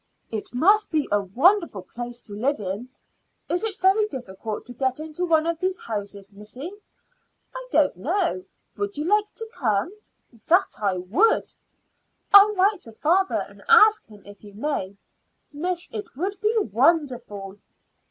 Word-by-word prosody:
"It 220 -2 -5
must 405 +12 +3
be 310 -3 0
a 205 0 +3
wonderful 265 - +2
place 240 +4 -7
to 205 - -11
live 255 +7 -1
in. 205 +5 -5 0.6
Is 355 +4 0
it 435 -3 -2
very 395 +3 +3
difficult 220 - -6
to 245 - -10
get 260 +2 -1
into 315 +3 -4
one 320 -1 +3
of 335 -1 -1
these 370 0 -1
houses, 205 -2 -6
missy?" 215 - -8 0.8
"I - - -7
don't - - +3
know. 370 -2 -1 0.3
Would 410 0 -3
you 300 - -2
like 420 +3 +2
to 450 - -7
come?" 220 - -1 0.5
"That 360 +4 +2
I 195 -3 +1
would." 235 - +1 0.8
"I'll 405 +1 +8
write 390 +1 +2
to 225 - -12
father 360 +11 +1
and - - -17
ask 435 -2 +6
him 210 -2 -16
if 205 0 -14
you 205 -1 -13
may." 205 -6 -3 0.6
"Miss, 345 +3 -3
it 215 +2 -6
would 385 +6 -4
be 430 +2 +1
wonderful." 235 - 0
295 Hz, 155 wpm, -24 LUFS, -, 0.8 s, I'll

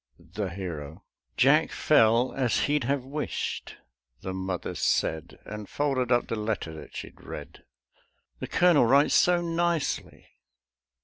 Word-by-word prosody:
THE 100 +3 -5
HERO 85 -5 -7 0.3
"Jack - - +4
fell 115 +3 +3
as 125 -4 +1
he'd 145 -3 +1
have 135 0 -1
wished," 145 +3 -4 0.4
the 95 - -4
Mother 95 -1 -4
said, 80 +1 -1
And 105 -1 -8
folded 135 -4 -1
up 120 0 +3
the - - -2
letter 105 -6 -3
that 80 - -11
she'd - - -8
read. - - -9 0.8
"The - - -5
Colonel 175 -8 +4
writes 140 +4 +4
so 180 -1 +4
nicely." 170 -2 -1
120 Hz, 130 wpm, -27 LUFS, 95-145 Hz, 0.8 s, Jack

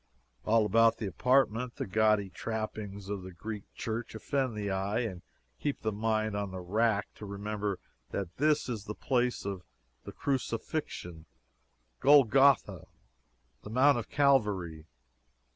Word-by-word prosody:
All 110 0 +4
about 115 +2 +4
the 110 - -4
apartment 125 +2 +1
the - - -3
gaudy 105 -1 +2
trappings 105 -1 -5
of 100 -1 -3
the 95 0 -9
Greek 105 +3 -7
Church 115 0 -4
offend 130 +1 -1
the 100 -1 -2
eye 100 +4 0
and 95 -7 -4 0.4
keep 145 - -2
the 110 - -1
mind 110 0 0
on 100 -1 -2
the 95 0 -6
rack 105 +3 0
to 105 - -10
remember 100 0 -3 0.3
that 95 -2 -5
this 150 +1 +2
is 110 -5 -4
the 105 - -5
Place 125 -4 0
of 100 -2 -3 0.4
the - - -8
Crucifixion 115 - -3 0.7
Golgotha 140 -1 +5 0.7
the - - -9
Mount 130 +3 +4
of 115 - -7
Calvary. 105 - +1
110 Hz, 140 wpm, -30 LUFS, 100-125 Hz, 0.7 s, Golgotha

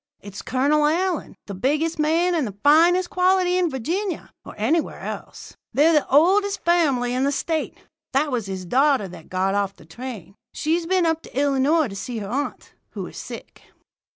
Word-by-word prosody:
It's 200 -1 -9
Colonel 295 +3 +2
Allyn, 350 +2 -1
the 200 - -7
biggest 305 - -1
man 330 +4 +2
and 310 -7 0
the 200 -1 -9
finest 345 +5 +4
quality 365 0 +2
in 365 -2 +2
Virginia, 340 - -3
or - - -11
anywhere 295 +10 0
else. - - -8 0.2
They're 310 +4 +4
the 300 - +2
oldest 390 +8 +3
family 280 -8 +2
in 255 +1 0
the 280 - +2
State. 315 +3 -2 0.3
That 285 +2 +1
was 235 -5 -2
his 190 -1 -5
daughter 265 +1 +2
that 170 -2 -12
got 190 +1 0
off 200 -1 -1
the 160 - -17
train. 205 0 -8 0.2
She's 330 +2 -1
been 370 -1 +2
up 325 -1 +1
to - - -12
Illinois 285 +2 +2
to 195 - -8
see 225 +5 -5
her 205 -2 -5
aunt, 275 +7 -4 0.2
who - - -5
is - - -11
sick.' - - -9
290 Hz, 180 wpm, -23 LUFS, 240-335 Hz, 0.3 s, finest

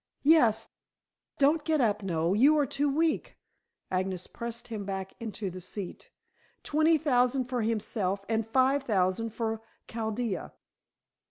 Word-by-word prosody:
"Yes. 275 -8 +5 0.7
Don't 295 +3 +3
get 315 -1 +1
up, 215 -4 +2
Noel, 170 -1 0
you 285 +8 +5
are 290 - +3
too 280 +2 0
weak." 315 +3 0 0.5
Agnes 185 -1 -1
pressed 235 0 -6
him 215 -3 -4
back 190 -1 -5
into 215 -4 -4
the 185 +1 -8
seat. 185 +1 -6 0.5
"Twenty 315 +2 +3
thousand 255 -3 +2
for 250 -1 -2
himself 210 -3 -1
and 225 -1 0
five 265 +4 +3
thousand 205 -2 0
for 225 0 -3 0.3
Chaldea." 220 -3 -3
225 Hz, 135 wpm, -29 LUFS, 200-275 Hz, 0.7 s, Yes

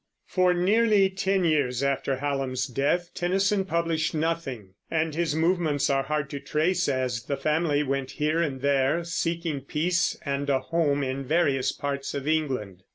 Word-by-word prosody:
For 185 -1 +2
nearly 200 +1 +3
ten 190 0 0
years 140 -6 +1
after 140 0 0
Hallam's 135 -2 -2
death 145 +7 0
Tennyson 195 +2 +1
published 165 -3 0
nothing, 150 - -2 0.2
and 160 -1 0
his 160 -1 0
movements 160 -4 +1
are 135 0 +2
hard 150 +1 -2
to 140 - -4
trace 170 +4 0
as 130 -3 -1
the 140 - -2
family 155 -1 +1
went 135 -1 -2
here 155 +2 +1
and 135 -6 -2
there, 140 +4 +2
seeking 165 -3 -2
peace 170 +6 0
and 140 0 -2
a 135 - +4
home 145 -4 0
in 135 +1 -3
various 140 -3 +1
parts 140 -1 -4
of 140 0 -4
England. 130 - -1
150 Hz, 160 wpm, -26 LUFS, 135-170 Hz, 0.2 s, a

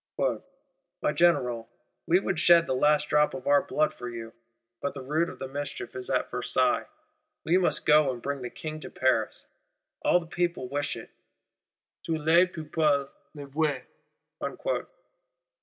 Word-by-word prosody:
'My 150 - +2
General, 125 -10 +2 0.4
we 175 +2 +5
would 195 -3 -2
shed 170 0 +6
the - - -1
last 150 +3 +3
drop 150 -2 +3
of 130 - -8
our 145 0 +5
blood 155 - 0
for 120 0 -7
you; 115 -1 -7 0.5
but 140 - -3
the 135 - -6
root 155 +5 0
of - - -10
the 135 - -5
mischief 145 - -5
is 385 0 -5
at - - 0
Versailles; - - +1 0.6
we 180 +3 +4
must 180 - 0
go 150 -2 +5
and 125 - -6
bring 140 +2 -4
the 125 - -4
King 155 +3 -6
to - - -8
Paris; 120 -4 0 0.6
all 180 - +4
the 170 - -9
people 170 -5 -2
wish 145 +2 -2
it, - - -10 0.9
tout 165 - -1
le 165 +4 +4
peuple 150 -4 0 0.2
le 145 -1 -7
veut. 145 -2 -1
150 Hz, 155 wpm, -28 LUFS, 135-165 Hz, 0.9 s, shed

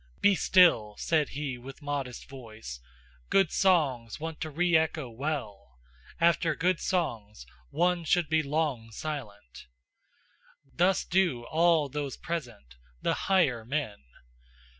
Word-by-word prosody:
"Be 205 - +5
still!" 170 - +4
said 155 -3 +1
he 140 -4 -4
with 135 +4 -11
modest 140 -4 -4
voice, 110 - -9 0.5
"good 195 -5 +3
songs 140 - +1
want 160 0 -6
to 160 - -3
re 175 +3 +1
echo 160 -5 +1
well; 115 - -5 0.4
after 170 -1 +3
good 180 +1 +1
songs 115 - -2 0.2
one 175 0 +1
should 175 +1 +2
be 160 +1 +2
long 140 -6 -2
silent. 105 - -7 1.0
Thus 175 +7 +1
do 175 -10 +1
all 160 +1 +3
those 140 0 -4
present, 120 - -6 0.3
the - - +2 0.2
higher 150 -12 +3
men. 130 -3 -3
150 Hz, 120 wpm, -29 LUFS, 120-170 Hz, 1.0 s, Be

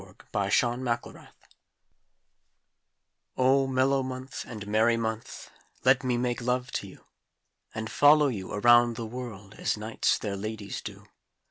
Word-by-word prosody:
[Illustration: 125 +1 -1
August] 120 0 -4 2.1
O 135 +1 +3
mellow 135 +1 +2
month 130 +1 -6
and 105 -4 -7
merry 110 +3 +2
month, 110 -1 -5 0.3
Let 130 +1 +5
me 125 -2 0
make 120 0 -1
love 125 +1 -1
to - - -3
you, - - -15 0.7
And 110 0 -3
follow 150 +4 +5
you 100 -8 -4
around 120 +2 +5
the 115 - -5
world 110 -4 -8
As - - 0
knights 110 +1 0
their 100 -2 -4
ladies 105 0 -5
do. - - -9
120 Hz, 130 wpm, -28 LUFS, 110-130 Hz, 2.1 s, Let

